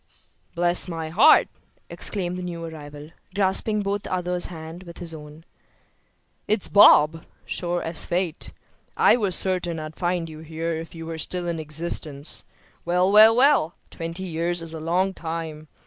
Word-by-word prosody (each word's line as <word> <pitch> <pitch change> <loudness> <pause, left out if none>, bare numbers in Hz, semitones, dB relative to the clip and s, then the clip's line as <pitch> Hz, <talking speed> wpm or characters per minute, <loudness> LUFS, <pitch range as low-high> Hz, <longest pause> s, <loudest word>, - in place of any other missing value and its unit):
"Bless 175 +1 +2
my 165 -2 -5
heart!" 205 - +6 0.4
exclaimed 180 -4 -2
the 180 - -5
new 170 -2 -6
arrival, 150 -1 -10 0.2
grasping 205 +2 +2
both 200 0 -2
the - - -9
other's 180 -1 -1
hands 165 +1 -9
with 170 -1 -12
his 170 -2 -2
own. 150 +1 -12 1.0
"It's 215 -2 +2
Bob, 165 -5 +6 0.2
sure 175 0 -3
as 165 -1 +1
fate. 175 -2 -2 0.5
I - - +5
was 200 -7 -1
certain 180 -3 0
I'd 155 0 -8
find 175 -2 -2
you 155 -1 -10
here 160 +1 -4
if 165 +1 -7
you 165 0 -8
were 165 0 -6
still 175 +2 -2
in 170 -1 -3
existence. 155 -1 -2 0.4
Well, 180 +2 +1
well, 215 +2 +8
well! 255 - +3 0.2
twenty 165 +3 -6
years 170 0 -2
is 165 -1 -10
a 160 - -6
long 180 +4 0
time. 160 -3 -6
170 Hz, 160 wpm, -24 LUFS, 160-180 Hz, 1.0 s, well